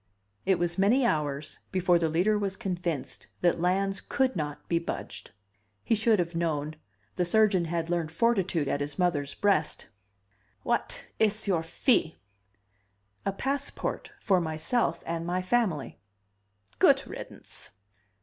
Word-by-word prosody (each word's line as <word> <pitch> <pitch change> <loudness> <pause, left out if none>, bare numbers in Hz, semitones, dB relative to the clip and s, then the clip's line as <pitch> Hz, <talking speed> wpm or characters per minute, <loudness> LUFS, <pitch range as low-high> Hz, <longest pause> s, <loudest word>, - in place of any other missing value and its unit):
It 190 - +4
was 170 +1 -1
many 235 +7 +4
hours 150 -6 -1
before 180 -2 +3
the 165 -1 +1
Leader 180 +7 +2
was 200 -2 -1
convinced 175 -6 -3
that 175 -1 +3
Lans 195 +2 +1
could 265 -1 0
not 150 -3 -4
be 170 - +2
budged. 170 - -6 0.5
He - - +1
should 225 0 +3
have 175 -2 -1
known 155 -3 -1 0.4
the 180 - +2
surgeon 195 -1 +3
had 165 0 -2
learned 170 -2 -1
fortitude 185 -6 +1
at 140 +1 0
his 145 0 -3
mother's 150 -6 0
breast. 195 -7 +1 0.8
"What - - -1
is 215 0 +2
your 180 -5 +2
fee?" 165 - +1 1.1
"A - - +2
passport 275 +7 -3
for 190 - +2
myself 160 +9 0
and 165 0 -2
my 180 +2 -1
family." 185 - 0 0.8
"Good - - +5
riddance." - - -4
175 Hz, 135 wpm, -28 LUFS, 160-200 Hz, 1.1 s, Good